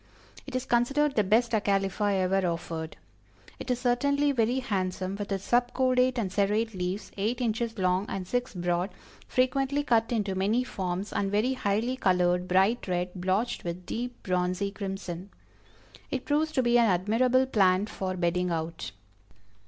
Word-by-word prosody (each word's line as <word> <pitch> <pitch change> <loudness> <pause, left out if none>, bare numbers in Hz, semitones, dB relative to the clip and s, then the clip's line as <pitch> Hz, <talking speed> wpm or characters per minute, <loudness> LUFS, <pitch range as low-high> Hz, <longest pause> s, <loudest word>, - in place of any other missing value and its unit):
It - - -6
is 255 0 -1
considered 275 +5 +2
the 210 - +3
best 225 +5 +2
Acalypha 200 -1 +1
ever 190 0 +1
offered. 165 -1 -4 0.6
It - - -7
is 250 -1 +1
certainly 280 +4 +2
very 240 -1 +1
handsome 190 -5 -2
with 205 0 -5
its 195 -1 -2
"sub 245 +2 +1
cordate 255 -1 +2
and 205 -6 -1
serrate 210 +3 +1
leaves, 185 +2 -4
eight 220 +5 -1
inches 230 -1 -1
long 185 +1 +1
and 185 -2 -4
six 245 +1 -2
broad, 175 +1 0 0.4
frequently 270 +3 +1
cut 230 -4 +2
into 205 -4 0
many 205 +6 +1
forms, 190 -4 -4
and 195 - 0
very 215 +6 +2
highly 235 +2 -1
colored 180 -3 +2
bright 195 +7 +2
red, 180 0 -1
blotched 190 +6 -1
with 175 +1 -5
deep 245 +1 -5
bronzy 180 +2 0
crimson." 195 -2 -5 0.8
It 260 - -3
proves 305 +2 +1
to 260 - +2
be 240 0 +4
an 235 - +5
admirable 230 +8 +3
plant 195 -5 +3
for 185 -3 -4
bedding 180 +1 0
out. 165 - -4
205 Hz, 160 wpm, -28 LUFS, 185-245 Hz, 0.8 s, an